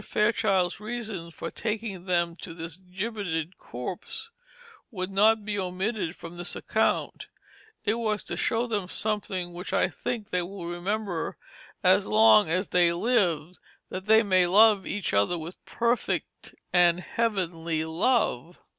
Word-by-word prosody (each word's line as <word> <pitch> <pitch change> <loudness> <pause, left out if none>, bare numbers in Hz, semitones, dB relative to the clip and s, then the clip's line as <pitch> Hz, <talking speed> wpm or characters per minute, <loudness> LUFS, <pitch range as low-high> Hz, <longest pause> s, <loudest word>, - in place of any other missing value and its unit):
Fairchild's 200 -5 +1
reason 215 -6 -5
for 170 - -7
taking 215 -4 -4
them 170 -2 +1
to 165 -1 -8
this 165 -2 -6
gibbeted 185 -2 -4
corpse 190 - -6 0.6
should 185 -3 -4
not 215 +2 +4
be 205 -1 -2
omitted 185 0 -2
from 170 +1 -10
this 175 0 -2
account; - - 0 0.6
it 210 - +3
was 220 -2 -1
"to - - -5
show 230 +1 +1
them 210 -6 -2
something 190 -5 -2
which 180 +3 -6
I - - +3
think 230 -4 -4
they 180 - +1
will 180 0 -7
remember 175 +1 -3 0.5
as - - +4
long 110 +4 +6
as 185 +4 0
they 175 -1 +4
live, 180 -5 +1 0.3
that 185 +2 -6
they 220 +1 +6
may 185 -3 +3
love 205 +1 +5
each 205 -2 -2
other 100 +13 +2
with 165 +3 -8
perfect 235 +1 -2 0.2
and 175 -1 +5
heavenly 170 -7 -1
love." 170 - 0
185 Hz, 140 wpm, -27 LUFS, 170-215 Hz, 0.6 s, long